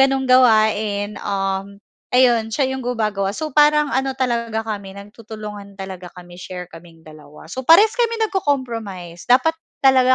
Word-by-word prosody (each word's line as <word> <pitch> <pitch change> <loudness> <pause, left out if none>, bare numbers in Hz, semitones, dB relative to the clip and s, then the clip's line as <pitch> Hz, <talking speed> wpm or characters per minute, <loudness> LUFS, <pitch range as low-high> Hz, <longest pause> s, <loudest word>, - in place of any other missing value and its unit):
gano'ng 270 0 +3
gawain, 215 -4 +2
um, 195 0 -3 0.3
ayun 240 -3 +3
siya 265 +3 -1
yung 265 - -4
gumagawa, 215 -5 -2
so 310 -1 -4
parang 300 0 +4
ano 265 0 -1
talaga 235 -3 -1
kami 200 -3 -6
nagtutulungan 210 -1 -10
talaga 190 -2 -8
kami 175 0 -12
share 180 -1 -8
kaming 165 0 -15
dalawa. 155 -1 -14
So 260 - -4
parehas 405 +7 +7
kami 465 -1 +1
nagko-compromise, 235 - -3
dapat 255 +6 +4 0.3
talaga 260 -1 +5
220 Hz, 140 wpm, -20 LUFS, 195-265 Hz, 0.3 s, parehas